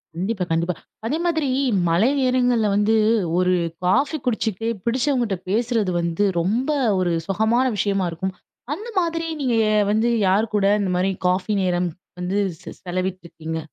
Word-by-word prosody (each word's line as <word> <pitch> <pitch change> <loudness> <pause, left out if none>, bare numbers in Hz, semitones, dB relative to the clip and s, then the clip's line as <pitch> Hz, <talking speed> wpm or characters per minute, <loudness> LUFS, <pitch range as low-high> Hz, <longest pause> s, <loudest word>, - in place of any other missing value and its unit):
கண்டிப்பா, 190 +2 -2
கண்டிப்பா. 170 +2 +1 0.3
அதே 290 +7 0
மாதிரி 320 -4 +1 0.4
மழை 175 +9 +3
நேரங்கள்ல 250 -4 +2
வந்து 210 +2 +3 0.4
ஒரு 180 0 +3 0.3
காஃபி 280 - +2
குடிச்சிட்டே 225 -2 -1 0.2
புடிச்சவங்ககிட்ட 240 -4 0
பேசுறது 225 -2 +1
வந்து 170 +4 0
ரொம்ப 220 - 0 0.3
ஒரு 175 -2 +1
சுகமான 220 +6 +2
விஷயமா 195 -2 0
இருக்கும். 185 +3 -4 0.4
அந்த 430 +9 -7
மாதிரி 330 -1 -1 0.2
நீங்க 250 -4 +1 0.4
வந்து 220 +3 +2 0.2
யார் 205 +4 +2
கூட 200 - +2 0.2
இந்த 190 - -1
மாதிரி 190 +2 +1 0.2
காஃபி 185 +3 0
நேரம் 180 -1 0 0.3
வந்து 180 +3 -2 0.3
செ - - -8
செலவிட்டிருக்கீங்க? 175 -3 -4
205 Hz, 135 wpm, -22 LUFS, 180-240 Hz, 0.4 s, மழை